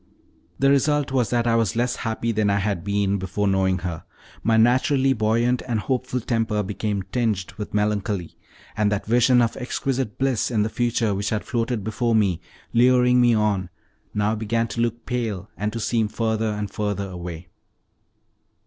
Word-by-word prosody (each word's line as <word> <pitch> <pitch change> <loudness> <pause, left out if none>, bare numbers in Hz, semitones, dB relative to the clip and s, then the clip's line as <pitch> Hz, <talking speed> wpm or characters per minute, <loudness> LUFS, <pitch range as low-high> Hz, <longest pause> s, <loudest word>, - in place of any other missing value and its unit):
The 135 0 +3
result 145 0 +2
was 125 -4 +1
that 120 -1 +1
I 115 -1 +3
was 115 -3 +1
less 120 +1 0
happy 115 0 -2
than 105 -2 +1
I 100 - +2
had 100 -3 -1
been 100 0 0
before 95 +2 -1
knowing 95 -1 +2
her: 85 -3 -4 0.4
my 110 -1 +2
naturally 130 +4 +3
buoyant 115 +2 +1
and 115 -3 0
hopeful 130 +2 -1
temper 110 -3 0
became 100 0 -2
tinged 110 -6 -1
with 105 - -5
melancholy, 105 -4 -1 0.4
and 105 -1 +1
that 105 - -1
vision 120 +2 +4
of 115 - -1
exquisite 130 -2 -2
bliss 135 -4 +1
in 110 -4 +1
the 110 - -1
future, 115 -2 0
which 100 +1 -2
had 105 -1 -1
floated 115 -3 -1
before 115 +2 0
me, 95 -6 +2 0.3
luring 125 +1 +5
me 120 -1 +4
on, 105 -4 0 0.4
now 105 +1 0
began 115 +1 -1
to 115 +3 -2
look 120 0 -2
pale, 115 -7 -3
and 105 +4 -2
to 115 - -4
seem 115 0 +1
further 110 0 -1
and 105 -2 -3
further 100 -1 -2
away. 90 -2 -7
110 Hz, 175 wpm, -23 LUFS, 105-120 Hz, 0.4 s, luring